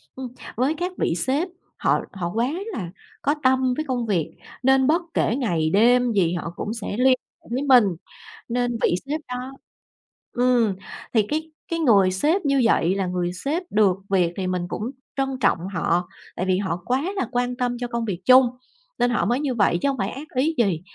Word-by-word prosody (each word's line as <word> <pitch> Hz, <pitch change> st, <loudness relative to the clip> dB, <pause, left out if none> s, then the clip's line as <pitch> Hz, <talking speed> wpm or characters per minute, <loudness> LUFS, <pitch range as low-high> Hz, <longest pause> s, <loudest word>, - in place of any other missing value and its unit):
Ừm, 260 Hz, -1 st, -5 dB, 0.3 s
với 260 Hz, +6 st, +1 dB
các 355 Hz, +3 st, -2 dB
vị -, -, +1 dB
sếp 265 Hz, -, 0 dB, 0.3 s
họ -, -, +2 dB
họ 175 Hz, -3 st, -3 dB
quá 235 Hz, +4 st, +1 dB, 0.2 s
là 180 Hz, -, -4 dB, 0.3 s
có 290 Hz, +2 st, +1 dB
tâm 260 Hz, -1 st, +3 dB
với 310 Hz, +4 st, -3 dB
công 245 Hz, -3 st, -1 dB
việc 180 Hz, -8 st, 0 dB, 0.3 s
nên 265 Hz, 0 st, +4 dB
bất 325 Hz, +4 st, +3 dB
kể 225 Hz, -, +1 dB
ngày 170 Hz, -, 0 dB
đêm 245 Hz, +5 st, +4 dB
gì 180 Hz, -5 st, +2 dB
họ 170 Hz, -1 st, -4 dB
cũng 215 Hz, -, -4 dB
sẽ 220 Hz, -2 st, -5 dB
liên 255 Hz, -, +4 dB, 0.4 s
hệ -, -, -19 dB
với 250 Hz, +3 st, 0 dB
mình 255 Hz, -6 st, +6 dB, 0.6 s
nên 245 Hz, -1 st, 0 dB
vị -, -, +3 dB
sếp 305 Hz, +2 st, -3 dB
đó 250 Hz, +1 st, -5 dB, 0.8 s
ừm, 245 Hz, -4 st, +3 dB, 0.4 s
thì 220 Hz, -, +5 dB
cái 315 Hz, +1 st, -2 dB, 0.2 s
cái 335 Hz, -, 0 dB
người 205 Hz, -, +4 dB
sếp 305 Hz, -, +1 dB
như 275 Hz, -1 st, +3 dB
vậy 185 Hz, -4 st, +3 dB
là 195 Hz, -1 st, 0 dB
người 180 Hz, 0 st, -2 dB
sếp 295 Hz, -, -2 dB
được 200 Hz, -3 st, +3 dB
việc 180 Hz, -3 st, +2 dB
thì 185 Hz, -2 st, -2 dB
mình 180 Hz, -1 st, -2 dB
cũng 220 Hz, +7 st, -4 dB, 0.3 s
trân 270 Hz, 0 st, +1 dB
trọng -, -, +4 dB, 0.2 s
họ, 175 Hz, +1 st, 0 dB, 0.3 s
tại 185 Hz, -, -2 dB
vì 185 Hz, -1 st, +2 dB
họ 190 Hz, -3 st, -2 dB
quá 255 Hz, +2 st, +1 dB
là 385 Hz, -, -1 dB
quan 245 Hz, 0 st, 0 dB
tâm 245 Hz, -1 st, -1 dB
cho 245 Hz, -, -2 dB
công 235 Hz, -1 st, -2 dB
việc 185 Hz, -4 st, -4 dB
chung 255 Hz, -1 st, +7 dB, 0.5 s
nên 245 Hz, 0 st, +3 dB
họ 240 Hz, -, +1 dB
mới 240 Hz, +4 st, +1 dB
như 275 Hz, -4 st, -1 dB
vậy 200 Hz, -5 st, +3 dB
chứ 280 Hz, -, +2 dB
hông 270 Hz, -, -2 dB
phải 195 Hz, -1 st, -1 dB
ác 290 Hz, +6 st, -8 dB
ý 305 Hz, +6 st, +1 dB
gì. 195 Hz, -9 st, +1 dB
245 Hz, 205 wpm, -23 LUFS, 190-265 Hz, 0.8 s, chung